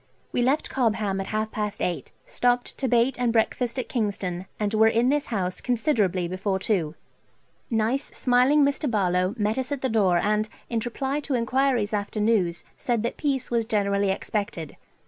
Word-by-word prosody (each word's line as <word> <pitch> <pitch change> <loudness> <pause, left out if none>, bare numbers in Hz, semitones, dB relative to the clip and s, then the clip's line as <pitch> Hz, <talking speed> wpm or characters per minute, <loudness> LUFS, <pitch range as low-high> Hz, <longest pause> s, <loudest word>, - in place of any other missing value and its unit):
We - - 0
left 270 +5 +1
Cobham 215 -6 0
at 195 - -6
half 215 0 -2
past 210 -1 -3
eight, 175 - -2
stopped 245 0 0
to 265 - 0
bait 245 +2 +2
and 245 -2 +2
breakfast 235 +2 0
at 255 - -2
Kingston, 195 -6 -2
and 210 0 -1
were 220 0 +5
in 230 +3 +3
this 290 +1 +1
house 185 -5 -2
considerably 215 - +1
before 190 +2 -1
two. 180 -6 -1 0.7
Nice 230 +4 +1
smiling 255 +4 +3
Mr. 280 +1 0
Barlowe 185 -2 +1
met 215 +3 0
us 260 +2 -2
at 280 -2 -2
the 260 - 0
door 200 -6 +3
and, 210 +4 +1 0.2
in 230 - +1
reply 270 +4 -2
to 285 -2 -2
enquiries 245 -2 +1
after 205 +1 -2
news, 205 -6 +1
said 235 -3 -1
that 235 - -2
peace 270 -4 -2
was 235 -1 +2
generally 200 -2 +1
expected. 195 -4 -3
220 Hz, 175 wpm, -25 LUFS, 200-250 Hz, 0.7 s, were